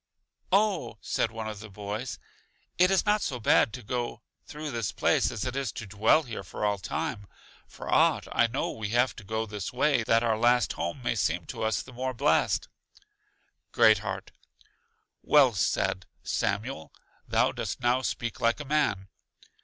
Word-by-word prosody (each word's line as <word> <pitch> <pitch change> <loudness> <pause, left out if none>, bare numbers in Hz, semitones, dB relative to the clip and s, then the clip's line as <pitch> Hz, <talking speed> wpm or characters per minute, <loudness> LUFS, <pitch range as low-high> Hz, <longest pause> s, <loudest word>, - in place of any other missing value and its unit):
Oh, 195 - +1
said - - -1
one 110 -1 -6
of 105 -2 -6
the 110 0 -10
boys, 105 +5 -5 0.6
it 180 +1 +6
is 195 -1 +2
not 210 0 +3
so 125 -3 -2
bad 110 0 +4
to 125 - -7
go 120 0 -3 0.2
through 150 0 -6
this 115 -5 -2
place - - +2
as 110 - -4
it 125 0 -3
is 135 -5 -1
to 115 - -6
dwell 105 +10 +3
here 115 -6 -6
for 100 - -4
all 100 -1 +1
time; 100 +2 -4 0.4
for - - -10
aught - - +3
I 120 - +3
know 120 +4 -2
we 110 -2 -5
have 125 -1 +2
to - - -9
go 110 +3 -2
this 105 -3 -5
way 130 0 +2
that 115 +1 +3
our 110 -2 +1
last 120 -1 +3
home 85 +10 -4
may 120 - +1
seem 90 -5 0
to - - -7
us 110 0 0
the 125 - -13
more 130 +1 -3
blest. - - +2 1.0
Great 110 -1 +5
heart: 95 -2 -5 0.9
Well 140 -5 +5
said, 95 -1 0 0.2
Samuel; 105 -2 -2 0.4
thou - - +2
dost - - -4
now 125 +2 +2
speak 120 -2 -3
like 115 +4 +2
a 150 - -6
man. 130 -10 0
115 Hz, 175 wpm, -28 LUFS, 105-130 Hz, 1.0 s, it